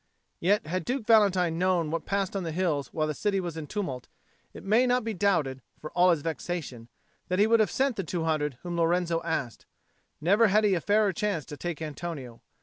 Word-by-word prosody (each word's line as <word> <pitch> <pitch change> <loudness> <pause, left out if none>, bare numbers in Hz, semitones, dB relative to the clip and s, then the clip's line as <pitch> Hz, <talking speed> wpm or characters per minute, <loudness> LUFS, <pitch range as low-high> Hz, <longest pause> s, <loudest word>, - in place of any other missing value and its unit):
Yet 200 +2 +2
had 180 +3 -2
Duke 250 - -2
Valentine 190 -7 +4
known 180 -4 +1
what 165 -2 -3
passed 200 -1 -1
on 195 - -1
the 165 -2 -4
hills 160 -5 -1
while 155 -1 0
the 155 - -2
city 200 +5 0
was 175 -3 -4
in 160 -2 -6
tumult, 140 -12 -4 0.4
it - - -11
may 225 +6 +3
not 250 0 +2
be 225 0 -3
doubted, 170 -9 0 0.2
for 155 - -8
all 180 +1 +4
his 165 -5 +2
vexation, 160 -8 -5 0.4
that 185 - -1
he 205 - +5
would 230 +1 +4
have 215 -4 +3
sent 270 -3 0
the 195 - -1
two 170 0 -3
hundred 150 -4 -1
whom 175 -1 -4
Lorenzo 170 0 +1
asked: 150 -8 -3 0.5
never 200 +8 +4
had 210 +2 +3
he 205 -2 +3
a 175 - 0
fairer 205 0 +2
chance 190 -5 -2
to 145 - -8
take 165 +2 -5
Antonio. 145 -6 -6
175 Hz, 215 wpm, -28 LUFS, 155-200 Hz, 0.5 s, he